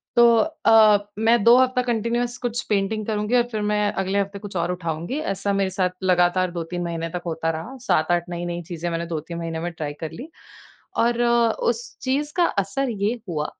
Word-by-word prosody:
तो 240 Hz, 0 st, +7 dB, 0.4 s
अ, 215 Hz, -2 st, +7 dB, 0.2 s
मैं 225 Hz, 0 st, +3 dB
2 235 Hz, +3 st, +7 dB
हफ्ता 255 Hz, -1 st, +3 dB
कंटीन्यूअस 240 Hz, 0 st, -1 dB
कुछ 240 Hz, -1 st, -2 dB
पेंटिंग 210 Hz, +1 st, 0 dB
करुँगी 210 Hz, +2 st, 0 dB
और 240 Hz, -, +5 dB
फिर 215 Hz, -, -2 dB
मैं 210 Hz, 0 st, +1 dB
अगले 195 Hz, +1 st, -1 dB
हफ़्ते 200 Hz, 0 st, -3 dB
कुछ 205 Hz, -2 st, -9 dB
और 170 Hz, +1 st, 0 dB
उठाऊँगी। 175 Hz, -, -3 dB
ऐसा 200 Hz, -6 st, -2 dB
मेरे 195 Hz, -1 st, +1 dB
साथ 185 Hz, -1 st, +3 dB
लगातार 180 Hz, 0 st, +2 dB
2-3 175 Hz, +1 st, -4 dB
महीने 165 Hz, -1 st, -3 dB
तक 175 Hz, +1 st, -5 dB
होता 165 Hz, -1 st, -2 dB
रहा। 165 Hz, +12 st, -7 dB
7-8 175 Hz, +2 st, +1 dB
नई-नई 175 Hz, 0 st, -4 dB
चीज़ें 175 Hz, 0 st, -3 dB
मैंने 165 Hz, 0 st, -2 dB
2-3 165 Hz, 0 st, -5 dB
महीने 165 Hz, -1 st, -4 dB
में 175 Hz, +1 st, -3 dB
ट्राई 155 Hz, -3 st, -5 dB
कर 160 Hz, -, -4 dB
ली 275 Hz, +7 st, -9 dB, 0.7 s
और 235 Hz, +1 st, +2 dB
उस 235 Hz, 0 st, +1 dB
चीज़ 285 Hz, +3 st, -1 dB
का 350 Hz, -, +5 dB
असर 200 Hz, +8 st, -1 dB
ये 210 Hz, 0 st, 0 dB, 0.2 s
हुआ 150 Hz, -3 st, -2 dB
195 Hz, 190 wpm, -23 LUFS, 170-235 Hz, 0.7 s, तो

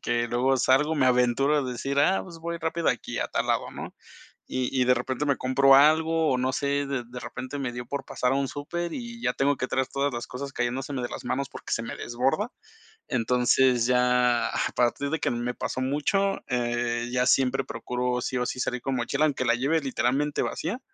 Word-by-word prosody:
que 120 Hz, 0 st, 0 dB
luego 125 Hz, +3 st, +2 dB
salgo, 135 Hz, +5 st, +3 dB
me 140 Hz, -4 st, +2 dB
aventuro 125 Hz, +3 st, +3 dB
a 145 Hz, -, +2 dB
decir: 135 Hz, +3 st, -2 dB
"Ah, 170 Hz, +7 st, +4 dB
pues, 170 Hz, -3 st, -11 dB
voy 170 Hz, +1 st, -4 dB
rápido 165 Hz, +1 st, -1 dB
aquí, -, -, -2 dB
a -, -, 0 dB
tal -, -, -2 dB
lado", -, -, 0 dB
¿no?, -, -, -7 dB, 0.5 s
y 130 Hz, -1 st, -1 dB
y, -, -, +3 dB
de 125 Hz, -, +4 dB
repente 130 Hz, +3 st, -2 dB
me 140 Hz, -2 st, +2 dB
compro 135 Hz, +1 st, +5 dB
algo 160 Hz, +3 st, +4 dB
o 125 Hz, -, +1 dB
no 130 Hz, +1 st, 0 dB
sé, 140 Hz, +1 st, 0 dB
de 135 Hz, -3 st, -3 dB
de 125 Hz, +1 st, -8 dB
repente 130 Hz, +4 st, -6 dB
me 130 Hz, -3 st, -3 dB
dio 120 Hz, 0 st, -6 dB
por 140 Hz, +2 st, -4 dB
pasar 125 Hz, -1 st, -1 dB
a -, -, +2 dB
un 140 Hz, 0 st, 0 dB
súper 170 Hz, +6 st, -4 dB
y 235 Hz, -1 st, -7 dB
ya -, -, +1 dB
tengo 140 Hz, +1 st, +2 dB
que 130 Hz, -, -2 dB
traer 130 Hz, 0 st, 0 dB
todas 140 Hz, 0 st, -1 dB
las 120 Hz, -, -4 dB
cosas 135 Hz, +2 st, -6 dB
cayéndose 130 Hz, +3 st, -2 dB
de 125 Hz, -3 st, -2 dB
las -, -, -7 dB
manos 130 Hz, +2 st, -2 dB
porque -, -, -8 dB
se -, -, 0 dB
me 115 Hz, -, -6 dB
desborda. 135 Hz, -, -1 dB, 0.6 s
Entonces, 125 Hz, +1 st, +3 dB
ya 125 Hz, -1 st, +3 dB
a -, -, -1 dB
partir 125 Hz, +4 st, +1 dB
de 160 Hz, -, 0 dB
que -, -, 0 dB
me 120 Hz, +1 st, -2 dB
pasó 130 Hz, -, -3 dB
mucho, 175 Hz, +9 st, 0 dB
eh, 120 Hz, -1 st, -1 dB
ya 125 Hz, 0 st, +1 dB
siempre 130 Hz, 0 st, +3 dB
procuro, 125 Hz, +2 st, -2 dB
sí 125 Hz, -, -2 dB
o 125 Hz, -, 0 dB
sí, -, -, -4 dB
salir 125 Hz, -1 st, -1 dB
con 135 Hz, -1 st, -1 dB
mochila, 140 Hz, +5 st, +1 dB
aunque 140 Hz, -4 st, -1 dB
la 115 Hz, -1 st, +3 dB
lleve, 140 Hz, +6 st, +1 dB
literalmente, 140 Hz, +1 st, 0 dB
vacía, 195 Hz, +11 st, -3 dB
130 Hz, 220 wpm, -26 LUFS, 125-145 Hz, 0.6 s, compro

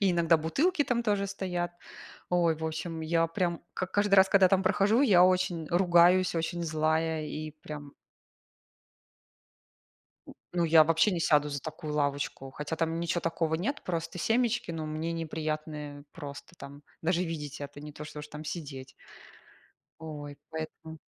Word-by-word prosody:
и 195 Hz, -2 st, +3 dB
иногда 170 Hz, -1 st, +4 dB
бутылки 290 Hz, -, +1 dB
там 240 Hz, -3 st, 0 dB
тоже 205 Hz, -3 st, +1 dB
стоят. 180 Hz, -3 st, -3 dB, 0.6 s
Ой, 170 Hz, -3 st, +3 dB
в 160 Hz, -, -6 dB
общем, 160 Hz, +1 st, -4 dB
я 165 Hz, +1 st, +2 dB
прям 170 Hz, +1 st, -1 dB
к -, -, -28 dB
как 185 Hz, 0 st, -3 dB
каждый 205 Hz, -1 st, +3 dB
раз, 190 Hz, 0 st, +7 dB
когда 190 Hz, -2 st, +6 dB
там 190 Hz, 0 st, +3 dB
прохожу, 200 Hz, +6 st, +3 dB
я 195 Hz, -10 st, +6 dB
очень 180 Hz, -3 st, +1 dB
ругаюсь, 175 Hz, 0 st, +4 dB
очень 165 Hz, +1 st, -2 dB
злая, 160 Hz, 0 st, 0 dB
и 155 Hz, +1 st, -5 dB
прям 145 Hz, -2 st, -8 dB, 2.6 s
Ну 175 Hz, -1 st, +2 dB
я 160 Hz, -1 st, +7 dB
вообще 165 Hz, +6 st, +3 dB
не 175 Hz, -3 st, -1 dB
сяду 150 Hz, -2 st, +3 dB
за 140 Hz, -1 st, -4 dB
такую 155 Hz, +1 st, -6 dB
лавочку, 145 Hz, -2 st, -2 dB
хотя 150 Hz, +4 st, -5 dB
там 165 Hz, +1 st, -1 dB
ничё 170 Hz, +1 st, -1 dB
такого 165 Hz, -1 st, -1 dB
нет, 240 Hz, -, -2 dB
просто 165 Hz, 0 st, -3 dB
семечки, 230 Hz, +2 st, +1 dB
но 160 Hz, -2 st, -4 dB
мне 155 Hz, +2 st, -3 dB
неприятно 155 Hz, -2 st, -4 dB
просто, 145 Hz, +2 st, -9 dB
там, 140 Hz, +1 st, -11 dB, 0.2 s
даже 175 Hz, +2 st, +1 dB
видеть 150 Hz, -3 st, -5 dB
это, 145 Hz, 0 st, -7 dB
не 150 Hz, 0 st, -9 dB
то, 150 Hz, -, -8 dB
что 150 Hz, 0 st, -8 dB
уж 150 Hz, -, -9 dB
там 150 Hz, +1 st, -8 dB
сидеть. 140 Hz, -5 st, -6 dB, 1.1 s
Ой 145 Hz, -3 st, -7 dB
поэтому. 160 Hz, 0 st, -7 dB
165 Hz, 160 wpm, -29 LUFS, 155-180 Hz, 2.6 s, раз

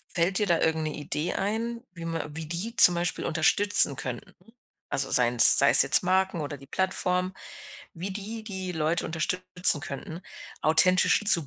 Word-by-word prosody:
fällt 180 Hz, +2 st, -1 dB
dir 210 Hz, -, -1 dB
da 170 Hz, -3 st, -1 dB
irgend 160 Hz, -1 st, -2 dB
eine 150 Hz, -, -9 dB
Idee 150 Hz, +2 st, -5 dB
ein, 230 Hz, +4 st, -5 dB
wie 170 Hz, -, -11 dB
man 165 Hz, -2 st, -7 dB
wie 165 Hz, -, -5 dB
die 180 Hz, +9 st, -6 dB
zum 175 Hz, -, +7 dB
Beispiel 175 Hz, +1 st, -3 dB
unterstützen 160 Hz, -1 st, +3 dB
könnten? 125 Hz, -2 st, -9 dB, 0.6 s
Also, 135 Hz, -, -2 dB
seien's 120 Hz, -1 st, +5 dB
sei's -, -, +5 dB
jetzt -, -, +4 dB
Marken 185 Hz, -2 st, -2 dB
oder 145 Hz, -1 st, -9 dB
die 135 Hz, -, -17 dB
Plattform, 185 Hz, +2 st, -3 dB, 0.6 s
wie 180 Hz, +4 st, -7 dB
die 215 Hz, +3 st, -9 dB
die 190 Hz, -3 st, -7 dB
Leute 160 Hz, +1 st, -3 dB
unterstützen 180 Hz, 0 st, +1 dB
könnten, 160 Hz, +4 st, -10 dB, 0.4 s
authentisch 185 Hz, +6 st, +2 dB
zu 170 Hz, -8 st, +5 dB
175 Hz, 160 wpm, -24 LUFS, 155-190 Hz, 0.6 s, zum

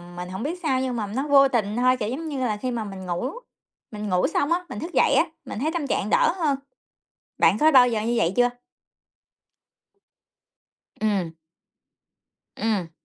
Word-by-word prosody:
mình 180 Hz, 0 st, -6 dB
hổng 190 Hz, +4 st, -5 dB
biết 335 Hz, +5 st, -3 dB
sao 265 Hz, -4 st, +1 dB
nhưng 255 Hz, -2 st, -2 dB
mà 215 Hz, -3 st, -2 dB
nó 260 Hz, +8 st, -3 dB
vô 275 Hz, -1 st, +6 dB
tình 220 Hz, -5 st, -1 dB
thôi, 255 Hz, +1 st, +3 dB
kiểu 210 Hz, -3 st, -3 dB
giống 305 Hz, +7 st, -4 dB
như 280 Hz, -3 st, -4 dB
là, 230 Hz, -5 st, -1 dB
khi 250 Hz, +4 st, -3 dB
mà 235 Hz, -2 st, -2 dB
mình 195 Hz, -2 st, -8 dB
ngủ 180 Hz, +9 st, -2 dB, 0.6 s
mình 210 Hz, -1 st, -5 dB
ngủ 180 Hz, -1 st, +2 dB
xong 295 Hz, -1 st, 0 dB
á, 355 Hz, +1 st, +1 dB
mình 205 Hz, -, -6 dB
thức 340 Hz, +8 st, -6 dB
dậy -, -, +3 dB
á, -, -, +5 dB, 0.2 s
mình -, -, -6 dB
thấy 305 Hz, +5 st, 0 dB
tâm 330 Hz, -5 st, -2 dB
trạng 210 Hz, -, -1 dB
đỡ 325 Hz, -, +3 dB
hơn. 300 Hz, -6 st, +1 dB, 0.8 s
Bạn 170 Hz, +5 st, +4 dB
có 310 Hz, +6 st, +4 dB
bao 255 Hz, -3 st, +7 dB
giờ 225 Hz, -3 st, -1 dB
như 230 Hz, +2 st, -1 dB
vậy 185 Hz, -6 st, +1 dB
chưa? 245 Hz, 0 st, +4 dB, 2.5 s
Ừm. 200 Hz, -6 st, 0 dB, 1.2 s
Ừm. 205 Hz, -7 st, -1 dB
240 Hz, 190 wpm, -24 LUFS, 205-275 Hz, 2.5 s, bao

